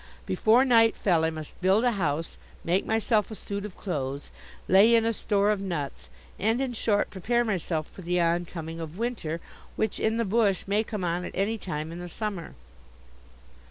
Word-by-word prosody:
Before 235 Hz, +5 st, +4 dB
night 230 Hz, -3 st, +5 dB
fell 170 Hz, -5 st, +2 dB
I 160 Hz, -, +3 dB
must 155 Hz, +1 st, -8 dB
build 190 Hz, +5 st, +4 dB
a 245 Hz, -, +4 dB
house, 165 Hz, -6 st, -1 dB, 0.3 s
make 180 Hz, +3 st, +1 dB
myself 220 Hz, -1 st, +2 dB
a 220 Hz, -, -6 dB
suit 200 Hz, 0 st, -5 dB
of 190 Hz, -, -15 dB
clothes, 140 Hz, -6 st, -4 dB, 0.4 s
lay 205 Hz, +5 st, +6 dB
in 225 Hz, -1 st, +3 dB
a 230 Hz, -, +2 dB
store 205 Hz, -1 st, +2 dB
of 205 Hz, -2 st, -1 dB
nuts, 170 Hz, -8 st, -4 dB, 0.3 s
and 225 Hz, +4 st, +2 dB
in 265 Hz, -2 st, -1 dB
short 215 Hz, -2 st, +1 dB
prepare 235 Hz, +6 st, 0 dB
myself 170 Hz, -7 st, -1 dB
for -, -, -12 dB
the 180 Hz, 0 st, 0 dB
oncoming 165 Hz, -1 st, -1 dB
of 165 Hz, +1 st, -7 dB
winter, 220 Hz, -9 st, -2 dB, 0.4 s
which, 220 Hz, -, -1 dB
in 220 Hz, +1 st, +1 dB
the 230 Hz, -, +1 dB
bush, 205 Hz, -2 st, +2 dB
may 205 Hz, +2 st, +1 dB
come 210 Hz, -4 st, -5 dB
on 175 Hz, +1 st, -1 dB
at -, -, -7 dB
any 215 Hz, +3 st, 0 dB
time 155 Hz, -4 st, -4 dB
in 170 Hz, -, -7 dB
the 175 Hz, 0 st, -7 dB
summer. 200 Hz, -3 st, -5 dB
195 Hz, 190 wpm, -27 LUFS, 170-220 Hz, 0.4 s, lay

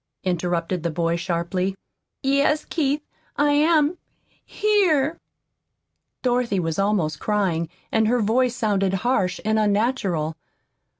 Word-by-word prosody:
interrupted 175 Hz, -1 st, -1 dB
the 170 Hz, -, -1 dB
boy 165 Hz, +1 st, 0 dB
sharply. 175 Hz, +2 st, -2 dB, 0.5 s
"Yes, 280 Hz, +3 st, +2 dB
Keith 295 Hz, -2 st, -1 dB, 0.3 s
I 290 Hz, 0 st, +3 dB
am 305 Hz, +2 st, +3 dB, 0.4 s
here." 345 Hz, -8 st, +1 dB, 1.0 s
Dorothy 245 Hz, -5 st, +1 dB
was 165 Hz, 0 st, -2 dB
almost 195 Hz, -7 st, 0 dB
crying, 185 Hz, -6 st, 0 dB, 0.2 s
and 220 Hz, -1 st, +2 dB
her 245 Hz, +2 st, +2 dB
voice 240 Hz, +3 st, +2 dB
sounded 195 Hz, -5 st, +1 dB
harsh 195 Hz, -8 st, +1 dB
and 220 Hz, 0 st, +2 dB
unnatural. 200 Hz, -7 st, 0 dB
210 Hz, 110 wpm, -23 LUFS, 175-270 Hz, 1.0 s, I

